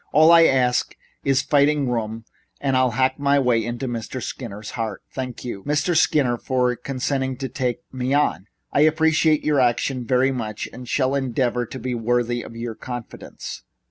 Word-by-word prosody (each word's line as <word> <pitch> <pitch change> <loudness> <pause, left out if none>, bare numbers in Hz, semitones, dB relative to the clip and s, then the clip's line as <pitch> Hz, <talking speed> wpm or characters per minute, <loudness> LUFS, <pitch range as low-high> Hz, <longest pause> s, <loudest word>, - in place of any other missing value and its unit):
"All 155 +2 +6
I 165 -1 +8
ask 125 -3 +2 0.3
is 135 -1 +2
fighting 145 -1 +3
room 115 -2 -3 0.3
and 135 -2 0
I'll 130 0 +3
hack 130 +1 +2
my 140 0 +3
way 125 -4 +2
into 120 +3 -4
Mr. 120 +1 -4
Skinner's 110 -4 -6
heart. 110 -4 -4
Thank 130 -2 -5
you, 100 -6 -5
Mr. 150 +4 0
Skinner, 135 -6 +3
for 125 -1 +1
consenting 130 0 -2
to 135 0 -3
take 130 0 -2
me 130 0 -2
on. 95 - +1 0.3
I 145 - +3
appreciate 155 0 +3
your 150 -2 +2
action 125 +1 +1
very, 125 +3 +2
very - - 0
much 110 -4 -4
and 125 0 -9
shall 130 -1 +1
endeavor 125 -3 0
to - - -7
be 130 -1 -3
worthy 120 +1 0
of 115 - -10
your 115 0 -4
confidence." 120 +1 -8
130 Hz, 175 wpm, -22 LUFS, 120-140 Hz, 0.3 s, I